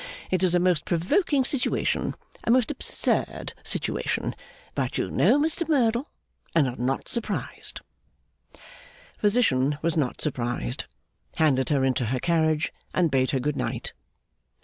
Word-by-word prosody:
It 185 -1 +1
is 180 -2 +3
a - - +4
most 180 -2 +2
provoking 260 - +1
situation, 265 -1 0 0.3
a - - -3
most 245 0 +4
absurd - - +2
situation; - - -1 0.4
but - - -2
you - - -2
know 290 - +4
Mr 320 +2 0
Merdle, 245 -2 +2 0.5
and 155 -5 +4
are 125 - -4
not 130 +2 -2
surprised.' 215 -4 -4 1.4
Physician 150 - +3
was 165 0 +1
not 140 -6 -1
surprised, 120 - -2 0.5
handed 135 -5 +2
her 140 -3 +2
into 130 -1 +1
her 125 +3 -1
carriage, 160 0 +1 0.2
and 170 -4 +2
bade 130 -1 +2
her 135 - 0
Good 145 +3 -1
Night. - - -3
165 Hz, 135 wpm, -26 LUFS, -, 1.4 s, a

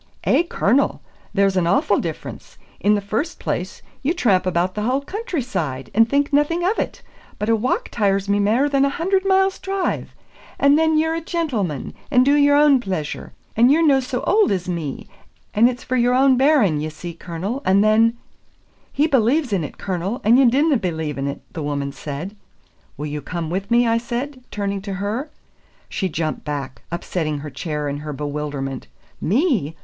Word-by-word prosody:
"Eh, - - +4
Cornel, 280 -6 +1 0.3
there's 195 -2 +2
an 180 -2 +2
awfu' 275 - +2
difference. - - -7 0.2
In 210 +1 +3
the 205 - -1
first 225 - -3
place, - - -4 0.2
ye 290 +5 +1
tramp 195 - +2
about 180 +1 0
the 210 - -3
haill 255 +5 +1
countryside, 255 - -4
and 225 +2 +4
think 285 +2 +1
naething 295 +4 +2
of 395 +6 +1
it; - - -4 0.3
but 210 +2 -2
a 225 - +5
walk 230 +4 -1
tires 200 -3 +1
me 200 0 +2
mair 225 +8 +3
than 275 -1 +2
a 280 - +3
hunard 375 +6 0
miles' 385 0 +2
drive; 390 -1 -2 0.4
and 280 +1 +5
then 320 0 +3
ye're 320 +1 +2
a 330 - -2
gentleman, 250 - -2 0.2
and 250 0 +4
do 280 - +4
your 285 0 +5
ain 290 -2 +5
pleasure; 185 -10 -4 0.2
and 240 +4 +5
you're 325 +3 +4
no 275 -3 +5
so 255 -1 -3
auld 425 -1 +3
as 185 -2 -1
me; 165 -6 -4 0.5
and 230 +4 +5
it's 250 +1 -6
for 255 - -2
your 245 0 +3
ain 265 0 +5
bairn, 250 - +3
ye 155 - -3
see, 170 +3 -8
Cornel; 180 +10 -5
and 195 +2 +4
then 225 +2 +4 0.4
" - - -37
"He 295 - +5
believes 265 -2 +2
in 185 -5 +1
it, 150 - -7
Cornel, 190 +4 -3
and 235 +5 +5
you 260 -3 +6
dinna 285 +3 +3
believe 160 -7 -3
in 135 - -1
it," 140 - -5
the 165 - -5
woman 140 -1 -2
said. 150 +8 -6 0.6
"Will 150 - -4
you 150 0 -4
come 170 -1 -4
with 195 +3 -3
me?" 240 +1 +4
I 230 0 +2
said, 255 +3 -5
turning 200 -1 -3
to 200 0 -5
her. 210 +10 -3 0.6
She 190 - -2
jumped 155 -1 -3
back, 140 -3 -5
upsetting 170 -3 -2
her 150 0 -7
chair 150 0 -3
in 140 0 -3
her 150 0 -6
bewilderment. 145 -2 -4 0.3
"Me!" 210 - +1
215 Hz, 190 wpm, -21 LUFS, 170-280 Hz, 0.6 s, you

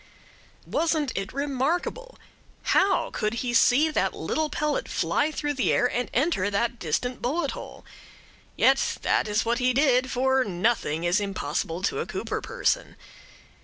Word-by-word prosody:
Wasn't 315 -4 0
it 195 0 -3
remarkable! 290 - -2 0.5
How 390 0 +2
could 215 +1 -2
he 240 - -1
see 275 +6 +4
that - - 0
little 315 -1 -1
pellet 300 0 -1
fly 295 - +1
through 295 -1 -2
the 265 -3 +1
air - - +3
and 245 0 -2
enter 250 - +1
that 230 +4 -1
distant 245 +10 -2
bullet 290 +3 -1
hole? - - -9 0.7
Yet - - +3
that - - +2
is 210 +1 0
what 235 +1 +1
he 250 0 +2
did; 260 -2 +3
for 265 +1 +2
nothing 185 -5 0
is 175 +4 +2
impossible 180 -3 -3
to - - 0
a - - -3
Cooper - - -3
person. 485 +1 -1
250 Hz, 150 wpm, -26 LUFS, 215-300 Hz, 0.7 s, see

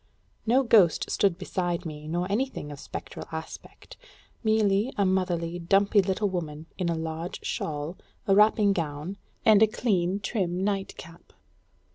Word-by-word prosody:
No 255 +4 +4
ghost 205 - +4
stood 195 -4 +2
beside 175 -2 -2
me, 150 -1 -7
nor 175 +3 -1
anything 220 - -2
of 145 - -9
spectral - - -8
aspect; 160 0 -9 0.5
merely 215 +1 +2
a 200 - +3
motherly, 175 -2 0
dumpy 200 +4 +3
little 195 +2 0
woman, 160 -5 -4
in 180 -2 -1
a 170 - 0
large 160 +2 -5
shawl, 150 +3 -3 0.3
a 195 - +3
wrapping 210 0 +5
gown, 160 +2 -4 0.3
and 215 -1 +6
a 220 - +7
clean, 195 -4 0
trim, 190 -3 -2
nightcap. 195 -4 -4
185 Hz, 140 wpm, -27 LUFS, 165-205 Hz, 0.5 s, a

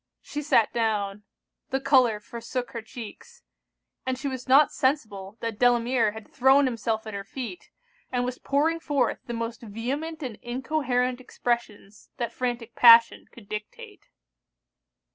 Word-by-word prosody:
She 295 - -5
sat 275 -7 +3
down; 210 -3 -1 0.4
the 265 -2 0
colour 255 -6 +4
forsook 235 +3 -5
her 230 - -5
cheeks; 250 - -11 0.6
and 260 -1 -2
she 270 - -4
was 260 -2 -5
not 275 +3 +6
sensible 215 -7 -1
that 230 -2 -4
Delamere 240 -2 +3
had 220 -1 -10
thrown 270 +2 +4
himself 225 -3 -2
at 220 - -7
her 200 0 -4
feet, 260 - -7 0.4
and 245 -1 0
was 250 0 -4
pouring 315 +4 +1
forth 290 -4 0
the 240 - -4
most 230 0 -4
vehement 275 +9 -4
and 240 -5 -5
incoherent 255 -1 -1
expressions 235 -5 -4
that 240 -3 -3
frantic 240 -2 -3
passion 230 -1 +7
could 225 -4 -15
dictate. 210 0 -8
245 Hz, 145 wpm, -26 LUFS, 225-265 Hz, 0.6 s, passion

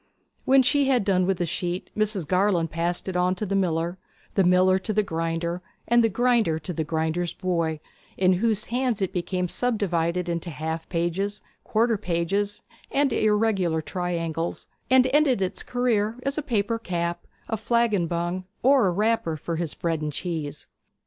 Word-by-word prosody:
When 265 0 +6
she 285 +2 +3
had 255 -6 +2
done 185 -2 +2
with 195 -2 +1
the 175 - 0
sheet 175 +2 -3
Mrs. 210 -6 0
Garland 180 -3 +2
passed 170 +3 -1
it 190 - -3
on 180 +1 +2
to 210 - -3
the 200 - -3
miller, 175 -1 0 0.3
the 195 - +3
miller 185 +1 +4
to 190 - -3
the 215 0 +2
grinder, 165 0 -2 0.3
and 240 0 +5
the 225 - +3
grinder 235 -6 +2
to 175 +3 -5
the 160 - -1
grinder's 160 +2 -1
boy, 170 -4 -1 0.4
in 185 0 +4
whose 220 -2 +1
hands 245 -2 -1
it 190 - -2
became 180 0 -1
subdivided 180 -6 0
into 170 0 -2
half 160 +2 -4
pages, 185 +4 -2 0.2
quarter 225 0 +2
pages, 200 +3 -1 0.3
and 275 -3 +2
irregular 210 -6 +2
triangles, 170 -2 -3 0.2
and 255 0 +6
ended 290 -6 +4
its 190 -1 -2
career 230 -3 0
as 275 0 -1
a 305 - -1
paper 230 -5 -1
cap, 175 -4 -3 0.2
a 225 - -1
flagon 220 -4 +1
bung, 175 +2 -2 0.2
or 260 -4 +5
a - - +2
wrapper 205 -4 0
for 165 +2 -4
his 165 -3 -3
bread 165 -2 -1
and 150 -1 -3
cheese. 155 -3 -4
185 Hz, 170 wpm, -25 LUFS, 170-220 Hz, 0.4 s, When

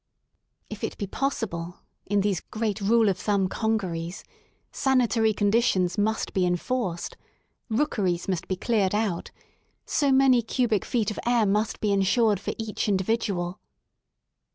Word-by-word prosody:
If - - -9
it - - -3
be 205 - -3
possible, 185 -8 -3 0.3
in 205 0 +2
these 195 -3 0
great 215 -1 -3
rule 225 +2 +4
of 195 -2 +1
thumb 200 -3 +1
congeries, 185 -5 -2 0.5
sanitary 245 -4 +2
conditions" 205 -4 +2
must 220 +2 -1
be 190 - +1
enforced; 180 +1 -2 0.5
rookeries 205 -8 0
must 185 -2 -2
be 185 - -1
cleared 205 -1 +1
out; 210 -5 -1 0.6
so 285 -2 +1
many 265 -2 +5
cubic 230 -3 0
feet 225 -3 0
of - - -6
air 240 -2 +3
must 210 +2 0
be 210 - +1
ensured 200 +1 +3
for - - -4
each 220 -1 -3
individual. 190 -3 -1
210 Hz, 135 wpm, -26 LUFS, 185-230 Hz, 0.6 s, many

